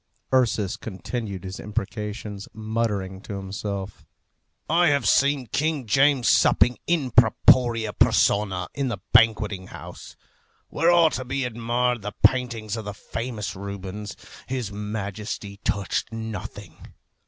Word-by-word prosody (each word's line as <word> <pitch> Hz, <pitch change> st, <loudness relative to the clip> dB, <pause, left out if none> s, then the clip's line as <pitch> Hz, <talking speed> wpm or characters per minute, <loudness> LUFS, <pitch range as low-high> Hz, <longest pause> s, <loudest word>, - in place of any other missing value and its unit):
Ursus 110 Hz, -6 st, +2 dB
continued 100 Hz, -1 st, -5 dB
his 95 Hz, 0 st, -6 dB
imprecations, 105 Hz, 0 st, -5 dB
muttering 110 Hz, -4 st, -2 dB
to 100 Hz, -, -7 dB
himself, 100 Hz, 0 st, -5 dB, 0.6 s
"I 170 Hz, +2 st, +4 dB
have 140 Hz, -7 st, +2 dB
seen 140 Hz, +3 st, +3 dB
King 145 Hz, +3 st, -1 dB
James 135 Hz, +2 st, +3 dB
supping 125 Hz, -, +4 dB
in 155 Hz, -7 st, +1 dB
propriâ 115 Hz, -1 st, +4 dB
personâ 95 Hz, -3 st, +2 dB
in 140 Hz, -1 st, -1 dB
the 120 Hz, -5 st, -2 dB, 0.2 s
Banqueting 110 Hz, -4 st, +3 dB
House, -, -, -10 dB, 0.5 s
where 165 Hz, +3 st, +2 dB
are 170 Hz, -2 st, +5 dB
to 130 Hz, -, -3 dB
be 135 Hz, +2 st, -2 dB
admired 120 Hz, +1 st, 0 dB
the 105 Hz, +1 st, -5 dB
paintings 115 Hz, -2 st, +2 dB
of 110 Hz, -2 st, -6 dB
the 105 Hz, 0 st, -5 dB
famous 115 Hz, -1 st, -5 dB
Rubens. 100 Hz, +1 st, -6 dB, 0.3 s
His 125 Hz, -6 st, -3 dB
Majesty 105 Hz, 0 st, -5 dB
touched 100 Hz, +2 st, -1 dB
nothing. 110 Hz, -2 st, -8 dB
110 Hz, 120 wpm, -24 LUFS, 100-125 Hz, 0.6 s, are